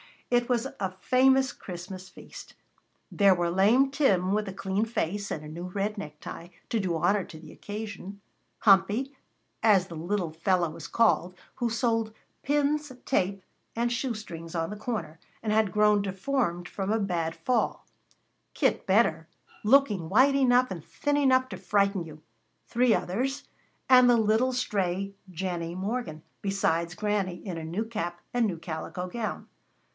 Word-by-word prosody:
It 240 -1 +3
was 240 -1 +1
a 190 -2 -1
famous 265 +1 +4
Christmas 185 +1 -8
feast. - - -12 0.6
There 200 -2 +5
were 175 -1 0
lame 225 +9 +4
Tim 195 - +2
with 210 0 0
a 195 - -5
clean 195 +2 -1
face, 205 -2 -2
and 155 - -4
a - - -8
new 170 +3 -6
red 200 +3 -2
necktie 155 -1 -8 0.2
to 230 - +1
do 185 -4 -1
honor 190 +5 +2
to 160 - -11
the 155 -1 -12
occasion; 205 -2 -7 0.4
Humpy, 205 +7 +3 0.5
as 195 -4 +4
the 170 - -7
little 175 +1 -2
fellow 170 +1 +1
was - - -8
called, 205 -5 +2 0.2
who 240 - -1
sold 225 -1 0 0.3
pins, 295 +1 0
tape, 195 -5 0 0.3
and 235 +1 0
shoe 240 0 -1
strings 165 -6 -8
on 165 +2 -1
the - - -4
corner, 210 -8 -4 0.2
and 215 - -1
had 215 -3 +2
grown 210 -1 +4
deformed 190 -2 -1
from 195 0 -3
a 220 - +3
bad 175 -6 -1
fall; 255 - -1 0.7
Kit - - +1
Benner, - - +3 0.4
looking 210 -8 +3
white 260 +8 +5
enough 255 -3 +4
and 170 -5 -5
thin 290 - -1
enough 260 -2 +3
to - - -6
frighten 200 -3 +1
you; 155 -1 -12 0.4
three 240 -1 +3
others, 265 +9 -2 0.5
and 250 -1 +8
the 240 - +6
little 220 +4 +2
stray 195 -5 -1 0.2
Jennie 175 -1 -4
Morgan, 190 -5 -3 0.2
besides 175 -4 0
Granny, 200 -3 -2
in 180 -4 -4
a 160 - -5
new 180 +8 -2
cap 175 -6 -4
and 240 -2 +2
new 180 -5 -3
calico 165 +2 -5
gown. 220 +3 -4
200 Hz, 160 wpm, -28 LUFS, 175-235 Hz, 0.7 s, and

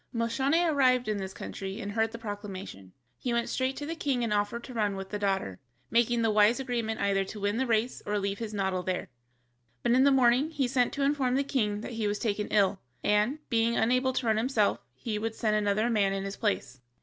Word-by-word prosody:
Moscione 265 +8 +1
arrived 255 -5 +3
in 215 -1 0
this 190 -1 -4
country 195 +2 -6
and 205 -3 -4
heard 225 +1 +1
the 230 - -7
proclamation. 200 - -7 0.3
He 245 - -2
went 235 0 0
straight 260 0 -1
to 290 - -4
the 325 - -3
king 275 -6 -1
and 225 -2 0
offered 205 +3 -1
to 255 - -9
run 210 -4 0
with 195 0 -6
the 205 - -3
daughter, 195 - -1 0.3
making 235 0 +3
the 225 - +3
wise 215 +4 +4
agreement 235 -4 -2
either 195 -1 +2
to 210 +2 -8
win 205 +2 0
the 260 +1 0
race 230 +2 0
or 210 0 -1
leave 200 0 -2
his 225 -2 -4
noddle 190 -3 -1
there. 180 -2 -3 0.7
But - - +2
in 255 +2 +5
the 280 - +6
morning 260 +2 +4
he 285 -5 0
sent 245 -1 +1
to 280 - -1
inform 275 -3 +1
the 275 - +2
king 210 -7 -1
that - - -6
he 225 -2 -1
was 205 0 -1
taken 210 -2 -1
ill, 200 -2 +2 0.2
and, 215 +9 +1
being 230 -1 +2
unable 255 +3 +2
to 255 - -1
run 220 -1 +2
himself, 225 -3 +1 0.2
he 215 -3 -3
would 225 +1 -3
send 215 -2 +1
another 210 +1 +1
man 205 -4 +2
in 195 0 -2
his 195 0 -4
place. 135 - -2
225 Hz, 230 wpm, -29 LUFS, 205-250 Hz, 0.7 s, the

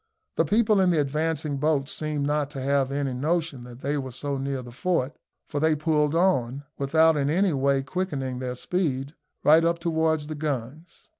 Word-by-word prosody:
The - - +2
people 215 -1 +3
in 185 - +4
the 170 -3 +2
advancing 150 0 -1
boats 145 -1 +1
seemed 150 -2 -2
not 145 -1 0
to 135 - -6
have 135 0 +1
any 140 -2 -1
notion 150 -1 -1
that 120 +1 -12
they 145 +2 -1
were 130 -1 -5
so 140 +2 -4
near 135 -1 -3
the 120 - -10
fort, 140 +1 -1 0.3
for 145 - -3
they 160 +1 +3
pulled 150 0 +1
on, 140 -7 +1 0.2
without 160 +3 +4
in 140 -1 0
any 180 +3 +2
way 135 0 +2
quickening 135 -5 -3
their 125 -1 -3
speed, 140 -3 -2 0.3
right 160 +2 +6
up 170 0 +2
towards 160 -2 0
the 155 - -5
guns. 150 +2 -5
145 Hz, 190 wpm, -26 LUFS, 135-160 Hz, 0.3 s, right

